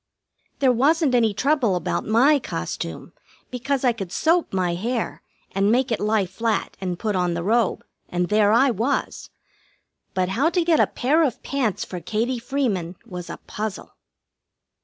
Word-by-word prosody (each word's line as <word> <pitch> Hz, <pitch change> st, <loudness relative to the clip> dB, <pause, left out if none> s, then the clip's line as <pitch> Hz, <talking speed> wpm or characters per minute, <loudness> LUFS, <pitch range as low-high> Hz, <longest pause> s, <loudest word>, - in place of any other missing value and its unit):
There 265 Hz, -2 st, +4 dB
wasn't 285 Hz, +4 st, +3 dB
any 230 Hz, -3 st, +4 dB
trouble 245 Hz, -1 st, +1 dB
about 175 Hz, -, -2 dB
my 265 Hz, +7 st, +4 dB
costume, 85 Hz, -, -5 dB, 0.4 s
because 265 Hz, +2 st, -2 dB
I 245 Hz, -2 st, +4 dB
could 195 Hz, -6 st, -6 dB
soap 335 Hz, -, +2 dB
my 180 Hz, -2 st, 0 dB
hair 230 Hz, +6 st, -3 dB, 0.3 s
and 195 Hz, +2 st, +2 dB
make 250 Hz, +1 st, +2 dB
it 225 Hz, -, 0 dB
lie 210 Hz, -1 st, +1 dB
flat, 220 Hz, +5 st, -2 dB
and 180 Hz, -2 st, -2 dB
put 210 Hz, +1 st, -2 dB
on 180 Hz, -2 st, 0 dB
the 170 Hz, -, -3 dB
robe, 225 Hz, +1 st, +1 dB, 0.2 s
and 175 Hz, 0 st, -1 dB
there 210 Hz, 0 st, +4 dB
I 250 Hz, +4 st, +5 dB
was. 235 Hz, +6 st, -2 dB, 0.9 s
But 185 Hz, -1 st, +1 dB
how 265 Hz, +12 st, +2 dB
to 345 Hz, 0 st, 0 dB
get 330 Hz, -2 st, +3 dB
a -, -, +5 dB
pair 295 Hz, +6 st, +1 dB
of 275 Hz, -8 st, 0 dB
pants 255 Hz, -8 st, -1 dB
for 180 Hz, -, -6 dB
Katie 230 Hz, +6 st, -1 dB
Freeman 230 Hz, -9 st, -2 dB
was 180 Hz, -1 st, -7 dB
a -, -, -6 dB
puzzle. 215 Hz, -1 st, -5 dB
225 Hz, 165 wpm, -23 LUFS, 190-265 Hz, 0.9 s, I